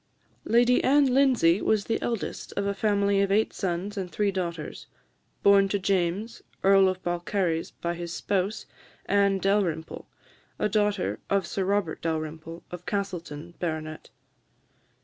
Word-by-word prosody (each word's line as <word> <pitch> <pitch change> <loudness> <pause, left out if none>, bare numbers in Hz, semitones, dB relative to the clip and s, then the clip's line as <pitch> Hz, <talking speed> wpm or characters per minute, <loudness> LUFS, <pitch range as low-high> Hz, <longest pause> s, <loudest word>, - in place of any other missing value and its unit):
Lady 240 +2 +4
Anne 275 -1 +4
Lindsay 245 -10 +4
was 215 -2 +1
the 225 - -1
eldest 230 -3 -4
of 200 - 0
a 200 - 0
family 200 -1 +2
of 200 0 +1
eight 215 +2 +2
sons 190 +2 -3
and 185 -2 -4
three 205 -1 +1
daughters, 170 -5 -5 0.6
born 200 -1 +6
to 200 - +1
James, 195 +3 -1 0.2
Earl 195 0 +6
of 185 0 -5
Balcarres, 175 -1 -1
by 170 0 -4
his 170 0 -6
spouse, 195 +3 -2 0.4
Anne 200 -1 +3
Dalrymple, 190 -5 -1 0.5
a - - +1
daughter 210 -2 0
of 195 -2 +1
Sir 190 +2 -2
Robert 195 -4 -1
Dalrymple, 160 +1 -4
of 180 0 -8
Castleton, 175 -5 -4
Bart. 155 -2 -4
195 Hz, 140 wpm, -27 LUFS, 170-205 Hz, 0.6 s, born